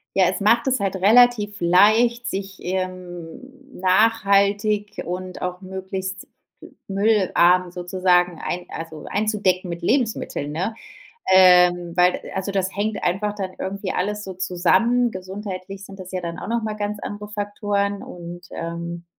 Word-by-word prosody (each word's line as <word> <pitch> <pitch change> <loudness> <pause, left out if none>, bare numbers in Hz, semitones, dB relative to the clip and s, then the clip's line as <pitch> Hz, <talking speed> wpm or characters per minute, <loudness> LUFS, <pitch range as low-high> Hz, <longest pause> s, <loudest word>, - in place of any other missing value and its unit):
Ja, 190 - +5
es - - -4
macht 230 +5 +3
es 255 -5 +1
halt 195 -1 -1
relativ 210 +1 +4
leicht, 220 +7 +4
sich, 195 -2 -4
ähm, 185 +4 -5 0.3
nachhaltig 205 +1 +2
und 180 +1 -5
auch 180 +1 -4
möglichst 190 0 -6 0.6
müllarm 190 -3 +3
sozusagen 180 -1 +1
ein 180 0 -3
also, 165 -1 -8
einzudecken 200 -4 0
mit 170 0 -5
Lebensmitteln, 215 - -1
ne? 185 +9 -2 0.6
Ähm, 180 -2 +6
weil 180 0 +3
also, 190 +1 -3
das 190 -1 -1
hängt 210 +1 -2
einfach 205 +4 0
dann 195 -2 -4
irgendwie 195 0 -4
alles 210 +3 -2
so 190 - -6
zusammen. 185 +7 +2
Gesundheitlich 190 0 -7
sind 195 0 -11
das 185 0 -9
ja 185 -1 -3
dann 170 0 -5
auch - - -7
nochmal 220 -2 -2
ganz 210 0 -3
andere 205 0 -6
Faktoren 205 -1 -2
und 175 0 -9
ähm, 170 +1 -6
190 Hz, 140 wpm, -22 LUFS, 180-210 Hz, 0.6 s, Ähm